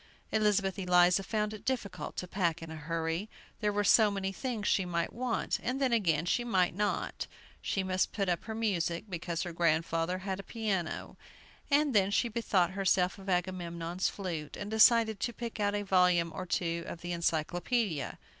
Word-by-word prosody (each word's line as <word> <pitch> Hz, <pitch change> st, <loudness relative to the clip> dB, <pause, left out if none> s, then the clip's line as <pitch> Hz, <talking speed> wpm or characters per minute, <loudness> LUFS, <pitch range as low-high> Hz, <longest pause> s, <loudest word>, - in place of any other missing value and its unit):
Elizabeth 205 Hz, -3 st, +2 dB
Eliza 180 Hz, 0 st, +4 dB
found 210 Hz, +1 st, -1 dB
it 215 Hz, -, -9 dB
difficult 245 Hz, -7 st, -3 dB
to 180 Hz, -, -3 dB
pack 170 Hz, -4 st, -1 dB
in 165 Hz, -, -8 dB
a -, -, -6 dB
hurry; 165 Hz, +5 st, -2 dB, 0.3 s
there 210 Hz, -2 st, +1 dB
were 205 Hz, 0 st, 0 dB
so 215 Hz, +2 st, +6 dB
many 195 Hz, -1 st, -2 dB
things 225 Hz, -1 st, -3 dB
she 195 Hz, -, +3 dB
might 170 Hz, -2 st, -2 dB
want, 245 Hz, -1 st, -1 dB
and 255 Hz, +3 st, -2 dB
then 260 Hz, -3 st, +2 dB
again 170 Hz, -8 st, +2 dB
she 240 Hz, +7 st, +1 dB
might 185 Hz, -8 st, +2 dB
not. 205 Hz, +3 st, -2 dB, 0.3 s
She 195 Hz, -, -1 dB
must 185 Hz, 0 st, 0 dB
put 200 Hz, -2 st, -1 dB
up 175 Hz, -1 st, -1 dB
her 220 Hz, 0 st, -5 dB
music, 180 Hz, -6 st, -1 dB
because 170 Hz, -1 st, -3 dB
her 175 Hz, -2 st, -5 dB
grandfather 165 Hz, +1 st, +1 dB
had 190 Hz, -1 st, -2 dB
a 200 Hz, -, -10 dB
piano; 200 Hz, -8 st, -2 dB, 0.5 s
and 290 Hz, -1 st, +3 dB
then 195 Hz, -2 st, +4 dB
she 235 Hz, +4 st, +1 dB
bethought 200 Hz, -6 st, +1 dB
herself 190 Hz, 0 st, +1 dB
of 195 Hz, 0 st, -8 dB
Agamemnon's 175 Hz, -1 st, -1 dB
flute, 170 Hz, -7 st, -5 dB
and 205 Hz, +1 st, -5 dB
decided 220 Hz, -1 st, +5 dB
to 240 Hz, -, -2 dB
pick 230 Hz, -1 st, -6 dB
out 205 Hz, 0 st, +1 dB
a 205 Hz, -, -1 dB
volume 180 Hz, -3 st, +3 dB
or 185 Hz, -, -5 dB
two 170 Hz, -1 st, -1 dB
of 170 Hz, -, -7 dB
the 175 Hz, -, -5 dB
Encyclopædia. 170 Hz, -, -1 dB
190 Hz, 185 wpm, -31 LUFS, 170-210 Hz, 0.5 s, so